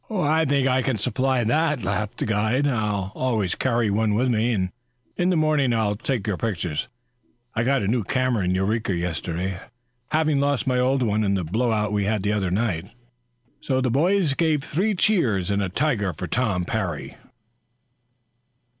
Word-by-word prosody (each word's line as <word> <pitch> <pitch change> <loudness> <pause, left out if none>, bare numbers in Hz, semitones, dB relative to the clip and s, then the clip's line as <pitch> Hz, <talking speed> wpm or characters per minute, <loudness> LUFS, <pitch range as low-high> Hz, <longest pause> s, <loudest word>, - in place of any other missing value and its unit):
"I 160 -6 +1
think 140 -2 +2
I 130 0 +2
can 130 -2 -1
supply 130 +3 0
that," 150 +3 +1
laughed 105 +2 -2
the - - -1
guide. 110 +6 +1
"I 105 -7 -1
always 110 -8 0
carry 115 -4 0
one 105 0 +1
with 125 +4 +2
me. 110 -4 +1 0.5
In 180 0 +1
the 185 - +2
morning 155 -5 +2
I'll 110 -3 +1
take 115 -1 -2
your 105 -4 -1
pictures. 85 -8 -2 0.7
I 115 - 0
got 135 -1 +2
a - - -1
new 115 +1 +1
camera 130 -1 0
in 90 +1 +1
Eureka 100 +1 0
yesterday, 90 +2 -3 0.5
having 155 -2 +1
lost 140 -1 +1
my 130 -2 +1
old 130 +1 +2
one 110 -1 +1
in 100 -1 +1
the 95 - -1
blow 115 +9 0
out 105 -1 0
we 100 -1 +1
had 105 -1 0
the 105 +1 +1
other 100 -3 0
night." 95 -3 -1 0.8
The 130 -2 +1
boys 170 +3 +2
gave 155 -2 +1
three 195 +9 0
cheers 115 - +1
and 100 0 +1
a 95 - -1
tiger 105 - 0
for 85 - -5
Tom 100 -2 0
Parry. 95 -8 -3
115 Hz, 175 wpm, -24 LUFS, 100-135 Hz, 0.8 s, think